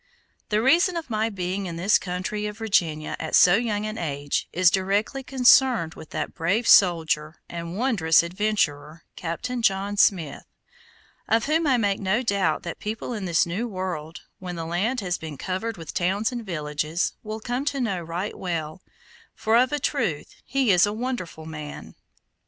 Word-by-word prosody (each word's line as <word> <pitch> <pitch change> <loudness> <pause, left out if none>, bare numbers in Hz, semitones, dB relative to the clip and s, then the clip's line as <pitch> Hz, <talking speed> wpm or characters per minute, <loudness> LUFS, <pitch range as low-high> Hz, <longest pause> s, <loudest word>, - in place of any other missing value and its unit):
The 215 +1 +1
reason 340 +6 +4
of 320 -7 -6
my 220 +1 +1
being 190 -1 -3
in 170 - -5
this 185 +5 +3
country 185 +4 -3
of 210 0 -7
Virginia 170 -9 0
at 160 - -1
so 175 - +7
young 210 -1 0
an 215 +1 -4
age, 145 -3 -2
is 180 0 +4
directly 200 +8 0
concerned 250 -8 +4
with 160 - -12
that - - -4
brave 195 +9 0
soldier 160 -4 +4
and 170 +1 -6
wondrous 200 -11 +3
adventurer, 170 -5 -1
Captain 235 +9 -4
John 200 -1 +1
Smith, 170 -8 +2 0.8
of 225 0 +2
whom 315 +2 +1
I 260 -3 +4
make 205 -4 +1
no 205 +5 0
doubt 195 -8 0
the 170 - -4
people 220 +3 -5
in 210 -4 -4
this 170 -2 +3
new 190 +8 -3
world, 180 -6 -5 0.2
when 180 -1 -6
the 165 -1 -4
land 205 +9 -1
has 180 -2 -2
been 155 -3 -7
covered 195 +7 -3
with 165 -3 -8
towns 195 +6 0
and 240 -2 -5
villages, 155 -2 -2
will 215 0 -6
come 245 +4 -3
to 285 -1 -1
know 200 -8 -1
right 170 +5 -4
well, 165 -1 -4 0.5
for 220 +1 +1
of 255 +3 +4
a 295 - +1
truth 230 - -2
he 270 -5 +1
is 180 +2 +5
a 205 - -2
wonderful 220 -9 -4
man. 150 -2 -8
195 Hz, 175 wpm, -25 LUFS, 170-225 Hz, 0.8 s, so